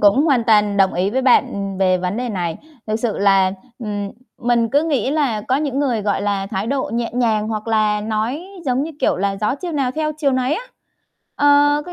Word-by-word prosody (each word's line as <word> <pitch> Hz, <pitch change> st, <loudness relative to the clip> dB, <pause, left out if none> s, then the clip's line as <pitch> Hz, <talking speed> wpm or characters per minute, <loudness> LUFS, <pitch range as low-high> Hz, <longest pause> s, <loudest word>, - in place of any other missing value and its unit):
cũng 205 Hz, +6 st, +5 dB
hoàn 265 Hz, -7 st, +2 dB
toàn 210 Hz, -2 st, +3 dB
đồng 195 Hz, -1 st, +3 dB
ý 185 Hz, +3 st, 0 dB
với 260 Hz, +4 st, 0 dB
bạn 200 Hz, -6 st, +2 dB
về 185 Hz, -1 st, +3 dB
vấn 180 Hz, +2 st, -2 dB
đề 250 Hz, +1 st, -2 dB
này. 175 Hz, -6 st, -3 dB, 0.3 s
Thực 215 Hz, 0 st, 0 dB
sự 225 Hz, -1 st, -2 dB
là, 195 Hz, -1 st, +4 dB, 0.3 s
ừm, 205 Hz, -4 st, -4 dB, 0.3 s
mình 235 Hz, -2 st, +1 dB
cứ 285 Hz, +2 st, +3 dB
nghĩ 280 Hz, -6 st, 0 dB
là 280 Hz, -8 st, 0 dB
có 255 Hz, +5 st, 0 dB
những 280 Hz, -2 st, -2 dB
người, 250 Hz, -7 st, 0 dB
gọi 200 Hz, -1 st, 0 dB
là, 200 Hz, -1 st, -1 dB
thái 195 Hz, +1 st, -3 dB
độ 270 Hz, -1 st, -1 dB
nhẹ 235 Hz, 0 st, -1 dB
nhàng 220 Hz, -3 st, +1 dB
hoặc 215 Hz, -1 st, -4 dB
là 215 Hz, -1 st, +2 dB
nói, 220 Hz, -, -2 dB, 0.2 s
giống 260 Hz, -1 st, +1 dB
như, 315 Hz, -, -4 dB
kiểu, -, -, +2 dB
là 195 Hz, +1 st, -1 dB
gió 210 Hz, +4 st, +1 dB
chiều 345 Hz, +4 st, -6 dB
nào 275 Hz, -4 st, 0 dB
theo 305 Hz, +1 st, -1 dB
chiều 285 Hz, -3 st, +1 dB
nấy 255 Hz, +3 st, +1 dB
á. 455 Hz, -, -4 dB, 0.7 s
Ờ, 290 Hz, -, +1 dB, 0.4 s
có 355 Hz, -, -7 dB
225 Hz, 220 wpm, -19 LUFS, 205-265 Hz, 0.7 s, cũng